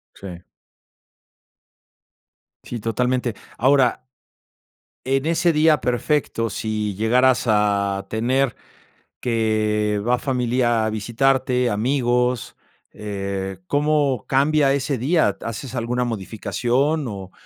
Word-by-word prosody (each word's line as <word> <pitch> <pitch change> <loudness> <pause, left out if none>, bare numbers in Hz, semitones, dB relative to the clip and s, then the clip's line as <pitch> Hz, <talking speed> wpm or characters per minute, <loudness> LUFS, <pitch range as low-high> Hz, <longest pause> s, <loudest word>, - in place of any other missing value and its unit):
Sí. 90 -3 -9 2.2
Sí, 120 - -5
totalmente, 120 +1 -1 0.2
ahora 130 -1 +3 1.0
en 135 +2 +1
ese 170 +1 +2
día 155 0 +4
perfecto, 125 -2 0
si 105 -1 -3
llegaras 125 +5 +3
a 100 -2 +1
tener 125 +3 0 0.6
que 110 -3 0
va 125 +1 +3
familia 120 -3 +1
a - - 0
visitarte, 125 +3 +1
amigos, 125 +1 0 0.4
eh, 100 -2 -4
¿cómo 145 -4 +1
cambia 140 +1 +3
ese 140 -1 -1
día? 155 +7 +2
¿Haces 120 +3 -6
alguna 125 +1 -1
modificación? 120 +7 -1
O 95 -2 -8
120 Hz, 95 wpm, -22 LUFS, 110-135 Hz, 2.2 s, día